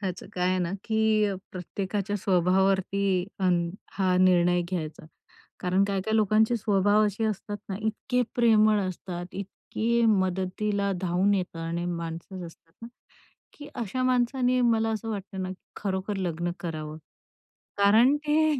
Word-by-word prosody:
त्याचं 190 Hz, -2 st, -4 dB
काय 180 Hz, 0 st, +1 dB
आहे 185 Hz, -, +1 dB
ना, 175 Hz, -1 st, -1 dB
की 220 Hz, -1 st, +2 dB
अ, 200 Hz, -1 st, 0 dB, 0.2 s
प्रत्येकाच्या 195 Hz, +3 st, -3 dB
स्वभावावरती 190 Hz, +1 st, +2 dB, 0.7 s
हा 185 Hz, -2 st, +1 dB
निर्णय 180 Hz, -1 st, +4 dB
घ्यायचा. 160 Hz, -4 st, -5 dB, 0.5 s
कारण 185 Hz, +2 st, +2 dB
काही-काही 200 Hz, +2 st, -1 dB
लोकांचे 220 Hz, +2 st, +3 dB
स्वभाव 205 Hz, 0 st, +3 dB
असे 210 Hz, +2 st, -2 dB
असतात 205 Hz, -1 st, -3 dB
ना 190 Hz, -, -3 dB
इतके 245 Hz, +3 st, 0 dB
प्रेमळ 215 Hz, -3 st, +4 dB
असतात. 180 Hz, -1 st, -5 dB
इतके 225 Hz, +4 st, -1 dB
मदतीला 195 Hz, +1 st, 0 dB
धावून 185 Hz, +2 st, +2 dB
येतं 180 Hz, -3 st, -3 dB
आणि 170 Hz, +1 st, -3 dB
माणसं 170 Hz, +2 st, -5 dB
असतात, 165 Hz, 0 st, -17 dB
ना -, -, -6 dB, 0.7 s
की 290 Hz, -1 st, -11 dB
अशा 240 Hz, +2 st, -2 dB
माणसाने 255 Hz, 0 st, +2 dB
मला 225 Hz, -2 st, +2 dB
असं 220 Hz, +1 st, -3 dB
वाटतं 195 Hz, -2 st, -5 dB
ना, 185 Hz, -, -3 dB
की 190 Hz, -, -14 dB
खरोखर 195 Hz, +1 st, -2 dB
लग्न 175 Hz, -2 st, -2 dB
करावं. 155 Hz, -2 st, -5 dB, 0.8 s
कारण 220 Hz, +7 st, +5 dB
ते 305 Hz, 0 st, +2 dB
195 Hz, 135 wpm, -27 LUFS, 180-220 Hz, 0.8 s, कारण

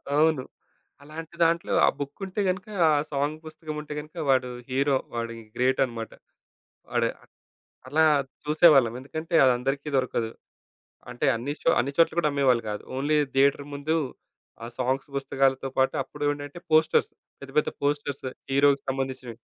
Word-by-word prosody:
అవును. 155 Hz, -3 st, +3 dB, 0.6 s
అలాంటి 160 Hz, +3 st, -9 dB
దాంట్లో 170 Hz, +1 st, +1 dB
ఆ -, -, +3 dB
బుక్కుంటే 185 Hz, +8 st, -4 dB
గనక 185 Hz, +2 st, -3 dB, 0.2 s
ఆ -, -, +4 dB, 0.2 s
సాంగ్ 145 Hz, +2 st, -1 dB
పుస్తకం 155 Hz, 0 st, -7 dB
ఉంటే 150 Hz, 0 st, -7 dB
గనక 155 Hz, +3 st, -11 dB
వాడు 130 Hz, -1 st, +3 dB, 0.2 s
హీరో. 135 Hz, +1 st, +2 dB, 0.2 s
వాడు 115 Hz, 0 st, -2 dB
ఇంగ 115 Hz, -1 st, -12 dB
గ్రేటనమాట. 125 Hz, -3 st, 0 dB, 0.8 s
వాడు -, -, +1 dB, 0.8 s
అలా 155 Hz, +4 st, +3 dB, 0.4 s
చూసేవాళ్ళం. 150 Hz, -6 st, +5 dB
ఎందుకంటే 155 Hz, +5 st, -6 dB
అదందరికీ 135 Hz, +3 st, +1 dB
దొరకదు 120 Hz, -3 st, 0 dB, 0.8 s
అంటే 120 Hz, -, -2 dB
అన్ని 135 Hz, +6 st, -3 dB
చో -, -, +4 dB
అన్ని 135 Hz, +3 st, 0 dB
చోట్ల 165 Hz, -1 st, +4 dB
గూడా 150 Hz, -3 st, +2 dB
అమ్మేవాళ్ళు 130 Hz, -4 st, +2 dB
గాదు. 105 Hz, 0 st, -4 dB
ఓన్లీ 150 Hz, +3 st, +1 dB, 0.2 s
థియేటర్ 140 Hz, +1 st, +3 dB
ముందు 145 Hz, +3 st, -1 dB, 0.7 s
ఆ -, -, -5 dB
సాంగ్స్ 130 Hz, +2 st, -1 dB
పుస్తకాలతో 135 Hz, 0 st, +1 dB
పాటు 130 Hz, 0 st, +2 dB
అప్పుడేంటంటే 145 Hz, +1 st, -4 dB
పోస్టర్స్ 155 Hz, 0 st, +4 dB, 0.3 s
పెద్ద, 140 Hz, -, -9 dB
పెద్ద -, -, -1 dB
పోస్టర్స్ 145 Hz, -1 st, -1 dB, 0.3 s
హీరోకి 140 Hz, 0 st, +4 dB
సంబంధించినవి. 130 Hz, -3 st, -4 dB
140 Hz, 135 wpm, -26 LUFS, 130-155 Hz, 0.8 s, చూసేవాళ్ళం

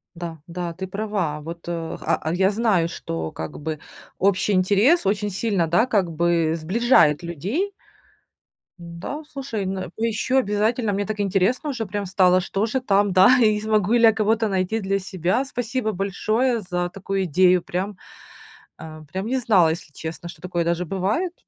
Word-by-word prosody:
Да, 170 Hz, -2 st, -7 dB
да, 175 Hz, 0 st, -4 dB
ты 190 Hz, +3 st, -6 dB
права. 195 Hz, -6 st, -2 dB
Вот, 165 Hz, +2 st, -9 dB
э, 165 Hz, -1 st, -4 dB
ха -, -, +1 dB
а, 160 Hz, -, -2 dB
я 190 Hz, +2 st, +3 dB
знаю, 205 Hz, -6 st, +1 dB
что 80 Hz, -, -5 dB
как 80 Hz, 0 st, -7 dB
бы 155 Hz, 0 st, -4 dB, 0.4 s
общий 200 Hz, +2 st, +2 dB
интерес 205 Hz, -, +3 dB
очень 205 Hz, +1 st, 0 dB
сильно, 195 Hz, -3 st, 0 dB
да, 175 Hz, +9 st, +3 dB
как 200 Hz, -8 st, 0 dB
бы 165 Hz, 0 st, +1 dB
сближает 175 Hz, -, +3 dB
людей. 195 Hz, -, -2 dB, 1.1 s
Н-да, 170 Hz, -, -7 dB
слушай, 260 Hz, -7 st, -4 dB
н 185 Hz, -2 st, -4 dB
поищу 230 Hz, +3 st, 0 dB
обязательно, 215 Hz, -1 st, +1 dB
мне 200 Hz, +1 st, -1 dB
так 215 Hz, +1 st, -4 dB
интересно 200 Hz, -, +1 dB
уже 235 Hz, -4 st, -3 dB
прям 200 Hz, +1 st, -4 dB
стало, 185 Hz, -1 st, +4 dB
что 195 Hz, +3 st, -1 dB
же 240 Hz, +4 st, -1 dB
там, 205 Hz, -5 st, +2 dB
да, 190 Hz, +7 st, +6 dB
и 215 Hz, -3 st, +3 dB
смогу 215 Hz, -2 st, +1 dB
ли 240 Hz, -1 st, +3 dB
я 225 Hz, -1 st, +7 dB
кого-то 220 Hz, +1 st, +1 dB
найти 195 Hz, +2 st, -1 dB
для 195 Hz, -1 st, -1 dB
себя. 185 Hz, +4 st, -1 dB
Спасибо 245 Hz, -3 st, -2 dB
большое 215 Hz, +5 st, 0 dB
за 180 Hz, -2 st, -2 dB
такую 195 Hz, +1 st, -3 dB
идею. 180 Hz, +2 st, +4 dB
Прям, 185 Hz, +4 st, -4 dB, 0.8 s
а, 155 Hz, -1 st, -10 dB
прям 190 Hz, +3 st, -3 dB
не 255 Hz, +4 st, 0 dB
знала, 205 Hz, -9 st, +4 dB
если 160 Hz, -1 st, -4 dB
честно, 160 Hz, +4 st, -7 dB
что 160 Hz, -, -12 dB
такое 175 Hz, -1 st, -2 dB
даже 170 Hz, +1 st, -1 dB
бывает. 195 Hz, -, -1 dB
195 Hz, 170 wpm, -23 LUFS, 175-220 Hz, 1.1 s, я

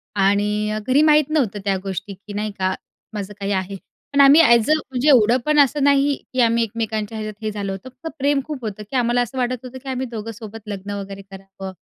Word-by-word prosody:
आणि 205 Hz, +2 st, +1 dB
अ, -, -, -2 dB
घरी 265 Hz, +3 st, +4 dB
माहीत 305 Hz, -1 st, +4 dB
नव्हतं 255 Hz, -10 st, 0 dB
त्या 195 Hz, -1 st, +2 dB
गोष्टी 195 Hz, +1 st, -5 dB
की 205 Hz, +2 st, -12 dB
नाही 210 Hz, +1 st, -2 dB
का 185 Hz, 0 st, +1 dB, 0.4 s
माझं 205 Hz, -1 st, -5 dB
काही 200 Hz, 0 st, -2 dB
आहे. 190 Hz, 0 st, -2 dB, 0.4 s
पण 280 Hz, -, +5 dB
आम्ही 280 Hz, +3 st, +8 dB
ॲज 235 Hz, -4 st, +5 dB
अ -, -, +7 dB
म्हणजे 265 Hz, -2 st, 0 dB
एवढं 240 Hz, -3 st, +5 dB
पण 300 Hz, 0 st, +3 dB
असं 285 Hz, 0 st, +3 dB
नाही 280 Hz, 0 st, +3 dB, 0.2 s
की 255 Hz, -, +2 dB
आम्ही 230 Hz, 0 st, +3 dB
एकमेकांच्या 220 Hz, -1 st, -3 dB
ह्याच्यात 215 Hz, 0 st, -7 dB
हे 215 Hz, -, -1 dB
झालं 200 Hz, -2 st, -4 dB
होतं. 195 Hz, +7 st, -7 dB
फक्त 260 Hz, +5 st, -10 dB
प्रेम 285 Hz, +1 st, +2 dB
खूप 300 Hz, -2 st, -5 dB
होतं 210 Hz, 0 st, -5 dB
की -, -, -6 dB
आम्हाला 245 Hz, 0 st, +2 dB
असं 245 Hz, +2 st, -4 dB
वाटत 250 Hz, 0 st, 0 dB
होतं 255 Hz, +1 st, -8 dB
की 270 Hz, -, -7 dB
आम्ही 260 Hz, 0 st, -2 dB
दोघं 225 Hz, 0 st, -5 dB
सोबत 225 Hz, 0 st, -9 dB
लग्न 200 Hz, -1 st, -6 dB
वगैरे 195 Hz, 0 st, -8 dB
करावं. 195 Hz, 0 st, -9 dB
225 Hz, 225 wpm, -21 LUFS, 200-265 Hz, 0.4 s, आम्ही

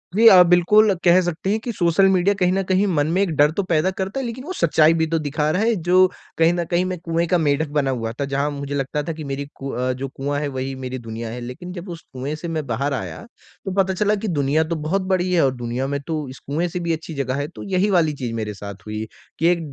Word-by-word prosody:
जी 225 Hz, +2 st, +6 dB
हाँ, 185 Hz, -4 st, +9 dB
बिल्कुल 200 Hz, +4 st, +5 dB
कह 175 Hz, +1 st, +6 dB
सकते 175 Hz, +1 st, -3 dB
हैं 215 Hz, -, +1 dB
कि 235 Hz, +2 st, -4 dB
सोशल 175 Hz, 0 st, +3 dB
मीडिया 190 Hz, +1 st, +3 dB
कहीं 180 Hz, -1 st, +3 dB
न 195 Hz, -, +1 dB
कहीं 190 Hz, +2 st, +2 dB
मन 150 Hz, -6 st, +1 dB
में 185 Hz, +3 st, +2 dB
एक 200 Hz, -, +1 dB
डर 145 Hz, +1 st, +4 dB
तो 200 Hz, +5 st, -1 dB
पैदा 165 Hz, +2 st, +2 dB
करता 190 Hz, +6 st, -3 dB
है 265 Hz, -, -3 dB
लेकिन 240 Hz, +2 st, -5 dB
वो 360 Hz, +6 st, -5 dB
सच्चाई 160 Hz, -, +4 dB
भी 160 Hz, -1 st, +1 dB
तो 165 Hz, +1 st, 0 dB
दिखा 150 Hz, 0 st, -1 dB
रहा 185 Hz, -, 0 dB
है 230 Hz, +1 st, +2 dB
जो 185 Hz, +1 st, +4 dB, 0.3 s
कहीं 165 Hz, +1 st, +4 dB
न 175 Hz, 0 st, -1 dB
कहीं 175 Hz, +2 st, +1 dB
मैं 185 Hz, 0 st, -3 dB
कुएँ 165 Hz, 0 st, -1 dB
का 180 Hz, -, +3 dB
मेढ़क 150 Hz, -1 st, +1 dB
बना 145 Hz, -2 st, 0 dB
हुआ 115 Hz, -3 st, -3 dB
था, 130 Hz, +5 st, -3 dB
जहाँ 140 Hz, +1 st, -1 dB
मुझे 140 Hz, 0 st, -5 dB
लगता 140 Hz, +2 st, -2 dB
था 165 Hz, -, -3 dB
कि 155 Hz, 0 st, -8 dB
मेरी 140 Hz, 0 st, -4 dB
कु 135 Hz, -, -6 dB
अ, 125 Hz, +2 st, -1 dB
जो 135 Hz, +2 st, -5 dB
कुआँ 140 Hz, +2 st, -3 dB
है 145 Hz, -, -2 dB
वही 135 Hz, -1 st, -4 dB
मेरी 130 Hz, 0 st, -5 dB
दुनिया 115 Hz, 0 st, -6 dB
है। 120 Hz, +2 st, -6 dB
लेकिन 125 Hz, +9 st, -7 dB
जब 180 Hz, +1 st, -8 dB
उस 170 Hz, -1 st, -7 dB
कुएँ 135 Hz, +4 st, -4 dB
से 155 Hz, +3 st, -7 dB
मैं 160 Hz, -3 st, -3 dB
बाहर 135 Hz, +5 st, -1 dB
आया, -, -, -5 dB, 0.4 s
तो 195 Hz, -, -2 dB
पता 190 Hz, 0 st, -1 dB
चला 210 Hz, +3 st, +1 dB
कि 210 Hz, +2 st, -4 dB
दुनिया 150 Hz, -2 st, +1 dB
तो 165 Hz, +1 st, -3 dB
बहुत 160 Hz, +5 st, -1 dB
बड़ी 185 Hz, -1 st, +1 dB
है, 175 Hz, -, +4 dB
और 130 Hz, -, +1 dB
दुनिया 120 Hz, +2 st, -3 dB
में 140 Hz, +1 st, -2 dB
तो 155 Hz, -3 st, -2 dB
इस 130 Hz, -, -10 dB
कुएँ 160 Hz, +5 st, 0 dB
से 175 Hz, +1 st, -4 dB
भी 170 Hz, -1 st, -1 dB
अच्छी 160 Hz, 0 st, -6 dB
जगह 135 Hz, -3 st, -2 dB
है 145 Hz, -, -3 dB
तो 170 Hz, -, -10 dB
यही 190 Hz, +2 st, +2 dB
वाली 170 Hz, -5 st, +3 dB
चीज़ 125 Hz, -5 st, -4 dB
मेरे 110 Hz, -2 st, -3 dB
साथ 100 Hz, 0 st, -8 dB
हुई, 110 Hz, +1 st, -4 dB, 0.3 s
कि 165 Hz, -, +3 dB
एक 175 Hz, 0 st, +3 dB
160 Hz, 275 wpm, -21 LUFS, 140-180 Hz, 0.4 s, हाँ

